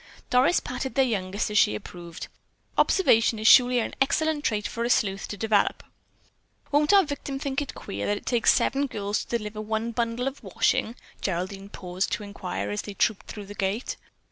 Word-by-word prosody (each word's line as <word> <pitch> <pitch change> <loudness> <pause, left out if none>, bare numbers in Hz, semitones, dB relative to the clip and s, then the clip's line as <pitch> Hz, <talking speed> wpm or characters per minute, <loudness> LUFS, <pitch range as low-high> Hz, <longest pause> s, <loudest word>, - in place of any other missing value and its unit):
Doris 255 +7 +4
patted 255 +1 -5
their 270 -1 +4
youngest 205 -3 -2
as 210 - +4
she 105 - +4
approved: 170 +8 -8 0.5
"Observation 230 - +4
is 215 - -5
surely 250 0 +7
an 235 - -1
excellent 305 +2 +1
trait 210 -5 0
for 235 - -4
a 235 - -1
sleuth 195 -5 +1
to 205 - -6
develop." 215 0 +1 0.9
"Won't 295 +3 +3
our 400 -1 +7
victim 285 -3 -5
think 275 0 -2
it 285 - -6
queer 100 +1 -5
that 205 - +1
it - - -11
takes 240 -3 +4
seven 280 +2 +1
girls 205 -3 -2
to 235 - -1
deliver 210 -1 -6
one 220 +2 -2
bundle 235 +2 -1
of 270 +1 -5
wash?" - - +2 0.5
Geraldine 195 +2 -3
paused 185 -1 -3
to - - -2
inquire 105 - -4
as 105 - -2
they 205 - -8
trooped 220 -1 0
through 205 -2 -7
the 205 - -9
gate. 200 +4 -2
220 Hz, 190 wpm, -26 LUFS, 200-260 Hz, 0.9 s, surely